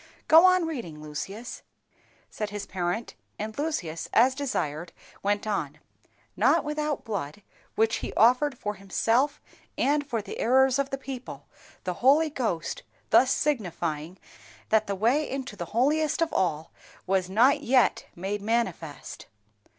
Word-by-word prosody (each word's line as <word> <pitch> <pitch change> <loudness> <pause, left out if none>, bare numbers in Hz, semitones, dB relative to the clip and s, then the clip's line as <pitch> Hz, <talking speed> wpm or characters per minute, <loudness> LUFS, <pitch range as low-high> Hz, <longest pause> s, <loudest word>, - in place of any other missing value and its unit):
"Go 325 +3 +8
on 365 -2 +4
reading, 235 - -5
Lucius," 195 +10 -7 0.7
said 210 -1 -4
his 205 -1 -5
parent, 185 +5 -3 0.2
and 215 +1 -5
Lucius, 195 - -3
as 255 +3 +5
desired, 175 - -3 0.3
went 205 +2 0
on. 160 -9 -2 0.6
"_Not - - +3
without 300 -1 -2
blood, 200 -4 -5 0.3
which 225 +1 +2
he - - -5
offered 255 +5 +4
for 210 -2 -3
himself 230 +8 0 0.4
and 290 +1 +2
for 235 -7 -3
the - - -8
errors 265 +2 +4
of 275 0 0
the 270 - -3
people, 265 -2 -8 0.4
the 180 - -2
Holy 295 +5 +5
Ghost 240 - -2 0.3
thus 260 0 +6
signifying 175 - -2 0.5
that 220 -1 +3
the 200 - -1
way 245 +10 +1
into 265 -4 -5
the 175 - -5
holiest 295 - +1
of 330 - -3
all 160 -4 0 0.3
was 185 -1 0
not 250 +8 +4
yet 255 -3 +2
made 195 +4 -3
manifest. 200 -9 -3
225 Hz, 140 wpm, -27 LUFS, 190-275 Hz, 0.7 s, Go